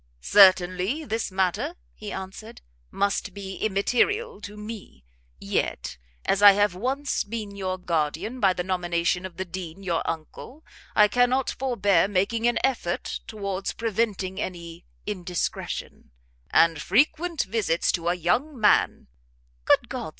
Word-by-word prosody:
"Certainly 185 - +4
this 225 -5 -2
matter," 185 -2 0 0.2
he - - -8
answered, 200 +4 -8 0.3
"must 200 -1 -1
be 195 -1 -7
immaterial 250 - 0
to 210 +1 -9
me: 210 - -9 0.3
yet, - - -2 0.3
as 200 - +1
I 205 -1 +10
have 205 -1 +2
once 265 +9 -1
been 210 -2 -6
your 185 -1 -3
guardian 170 - -2
by 195 -5 +4
the 180 - -3
nomination 175 0 -1
of 180 - -18
the 190 - -3
Dean 180 0 -7
your 170 -3 0
uncle, 165 - -7 0.3
I 210 - +7
cannot 245 +4 +2
forbear 205 -9 +2
making 205 +4 +1
an 240 - +2
effort 245 -10 -1
towards 200 -3 -4
preventing 205 -4 -2
any 170 -1 -7 0.2
indiscretion: 180 -4 -4 0.4
and 165 -2 +4
frequent 305 - +2
visits 205 -7 0
to 170 -1 -3
a 175 - +1
young 245 - 0
man 210 - +3 0.3
" - - -38
"Good - - +4
God! - - -5
195 Hz, 135 wpm, -25 LUFS, 180-230 Hz, 0.4 s, I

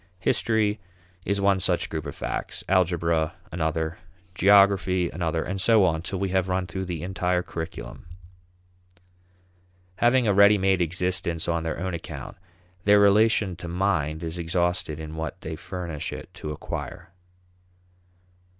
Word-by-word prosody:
History 105 +2 +1 0.5
is 100 0 +1
one 100 -1 +3
such 90 -2 0
group 80 -2 -5
of - - -7
facts; - - -4
algebra 85 -4 +1 0.2
another; 80 -1 -2 0.3
geography 95 -2 +4
another, 80 -1 -1
and 95 0 -4
so 110 -2 +5
on 80 -3 +1
till 95 +3 -4
we 100 0 -1
have 95 0 +1
run 90 0 0
through 95 +2 -5
the 85 -3 -5
entire 90 -1 0
curriculum. 80 -6 -7 1.9
Having 120 +1 +3
a 105 - +3
ready 100 +1 +6
made 95 -1 +2
existence 85 -1 -1
on 85 -1 0
their 80 0 -3
own 95 +1 -3
account, 85 - -7 0.5
their 105 0 +6
relation 100 -1 +4
to 85 - -7
mind 85 -3 -1
is 80 +1 -4
exhausted 85 -2 -1
in 80 0 -7
what 80 +3 -4
they 80 +1 -5
furnish 85 -2 -5
it - - -9
to 75 - -7
acquire. 85 +3 -6
90 Hz, 140 wpm, -25 LUFS, 80-95 Hz, 1.9 s, ready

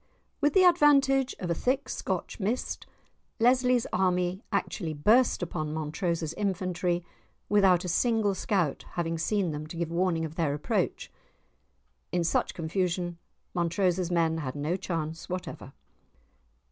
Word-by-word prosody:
With 290 0 +3
the 380 - +7
advantage 280 -6 +4
of 175 -2 -3
a - - +4
thick 260 - 0
Scotch - - -3
mist, 220 +5 -2 0.5
Lesly's 250 0 +3
men 180 0 +1
actually 160 -6 -2
burst 215 - +3
upon 155 -2 -3
Montrose's 160 +1 -2
infantry 180 -3 -1 0.4
without 190 -4 +4
a - - -2
single 215 +2 +2
scout 185 -5 -1
having 165 -1 -2
seen 195 -1 0
them 150 0 -5
to 165 - -8
give 170 -1 -2
warning 170 -2 +1
of 155 - -7
their 150 -4 +1
approach! 150 - -2 1.0
In 175 -1 +1
such 170 - 0
confusion, 175 0 -2 0.3
Montrose's 175 +1 +1
men 165 -2 +1
had 130 -3 -4
no 150 +4 -1
chance 165 -3 -4
whatever. 180 -6 -6
180 Hz, 135 wpm, -28 LUFS, 165-205 Hz, 1.0 s, the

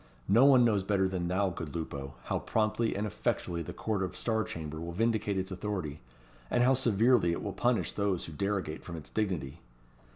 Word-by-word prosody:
"No 115 +7 +6
one 130 -3 +7
knows 105 -4 +3
better 95 0 +1
than 90 -2 -2
thou, 95 +2 +1
good 80 -2 -6
Lupo, 70 -4 -5
how - - -1
promptly 110 +1 0
and 100 +2 -1
effectually 85 -3 -2
the 80 - -5
court 110 -3 -2
of 95 -2 -3
Star 110 -1 0
Chamber 80 -4 -6
will 85 +1 -5
vindicate 110 0 +1
its 95 +1 -2
authority, 90 -6 -3 0.5
and 120 - +3
how 130 +2 +5
severely 115 -6 +3
it - - -4
will 100 - -3
punish 120 -1 +1
those 100 -3 -1
who 80 - -8
derogate 95 -2 -2
from 85 -1 -7
its 75 - -10
dignity. 95 -11 -2
100 Hz, 195 wpm, -31 LUFS, 85-110 Hz, 0.5 s, one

